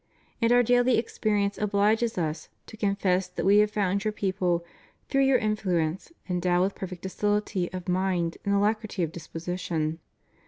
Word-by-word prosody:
And 230 +1 +3
Our 245 0 +6
daily 245 +1 +3
experience 210 -3 0
obliges 210 +2 +1
Us 155 -2 -3 0.2
to - - -11
confess 195 -3 +1
that 180 - -4
We 200 +2 +6
have 210 0 +4
found 200 -1 0
your 215 - 0
people, 185 -4 -1 0.4
through 275 -1 +3
your 270 -1 +5
influence, 190 - -1 0.2
endowed 180 -1 +1
with 195 +1 0
perfect 185 -2 -7
docility 205 -1 -1
of 185 0 -7
mind 180 -2 0
and 200 0 +1
alacrity 210 -1 0
of 160 - -2
disposition. 165 -1 -4
195 Hz, 155 wpm, -27 LUFS, 180-215 Hz, 0.4 s, Our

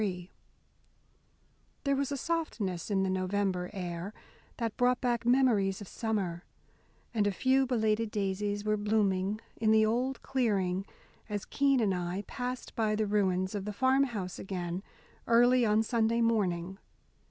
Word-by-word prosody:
III 180 -3 -3 1.5
There 280 -1 +2
was 280 0 -1
a 280 - -1
softness 240 - -2
in 195 -2 +2
the 190 - 0
November 185 -1 -1
air 180 0 -5 0.4
that 230 -2 -2
brought 250 0 +2
back 240 -2 -1
memories 230 -7 +3
of 205 - -9
summer, 195 -7 -2 0.7
and 210 -3 +2
a - - +2
few 265 +6 +2
belated 220 -2 +1
daisies 205 0 -2
were 215 0 +2
blooming 205 -1 +1 0.2
in 220 -1 +1
the 220 0 +5
old 250 +4 -1
clearing, 195 -7 0 0.4
as 205 -1 -3
Keene 275 -3 +2
and 200 -3 +2
I 180 +2 -3
passed 250 0 -5
by 215 -2 +1
the 215 0 0
ruins 190 -2 +1
of 205 -2 -3
the 210 - -4
farm 265 +5 +3
house 200 -8 -5
again, 180 -2 -4 0.5
early 245 +1 +5
on 215 +1 +3
Sunday 230 0 +1
morning. 190 -5 0
210 Hz, 150 wpm, -30 LUFS, 190-240 Hz, 1.5 s, the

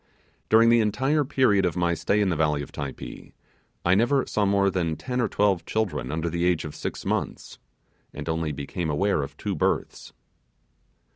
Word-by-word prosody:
During 115 +1 +6
the 120 0 +5
entire 135 +8 +1
period 125 -7 +2
of 90 -1 0
my 85 -1 +2
stay 100 +6 +1
in 100 - +2
the 85 - 0
valley 75 -2 +1
of - - -11
Typee, 70 -2 -7 0.5
I 85 - +4
never 120 +7 +3
saw 105 -2 0
more 100 0 +3
than 85 -4 -1
ten 125 +7 -3
or 120 - +2
twelve 100 -4 +1
children 105 - -2
under 80 +2 -2
the 85 +1 -2
age 90 -3 +1
of 75 - -6
six - - -5
months, - - -3 0.5
and - - -8
only 80 -1 -1
became 75 +4 -4
aware 85 +3 +1
of 70 0 -7
two 105 - -3
births. 75 - -2
95 Hz, 185 wpm, -25 LUFS, 80-105 Hz, 0.5 s, During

